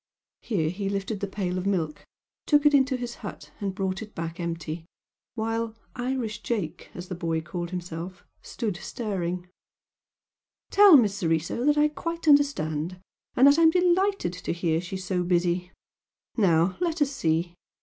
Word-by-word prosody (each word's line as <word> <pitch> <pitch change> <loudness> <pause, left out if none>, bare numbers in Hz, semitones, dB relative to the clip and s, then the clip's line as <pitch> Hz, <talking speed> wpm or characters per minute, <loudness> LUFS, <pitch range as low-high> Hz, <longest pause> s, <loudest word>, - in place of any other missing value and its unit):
Here 165 -9 0
he 195 +1 -3
lifted 200 +1 -2
the 200 - -2
pail 185 -2 -2
of 185 - -3
milk, 165 -6 -1 0.4
took 295 -1 +4
it 295 - +6
into 265 -2 +4
his 245 -1 -6
hut 160 -8 -8
and 195 -2 -3
brought 190 0 -2
it 215 -1 -10
back 165 +1 -5
empty, 165 -1 -4 0.5
while 225 0 -2 0.2
"Irish 245 -4 -3
Jake," 180 -9 -3
as 180 +1 -7
the 185 - -5
boy 170 -2 -2
had 160 -1 -2
called 175 0 -4
himself, 180 0 -6 0.2
stood 215 -7 -4
staring 180 -5 -3 1.2
"Tell 400 -5 +9
Miss 210 -6 +2
Soriso 165 +7 0
that 295 0 +4
I 300 0 +5
quite 330 +3 -5
understand! 180 - +2 0.4
And 260 - +6
that 285 +3 +7
I'm 325 -1 +7
delighted 360 - +2
to 180 0 -4
hear 170 -1 0
she 185 +2 -6
is 190 - -5
so 180 -1 0
busy! 175 0 0 0.6
Now, 180 -4 +3
let 335 -3 +1
us 280 - -2
see!" 170 - 0
190 Hz, 165 wpm, -26 LUFS, 175-250 Hz, 1.2 s, Tell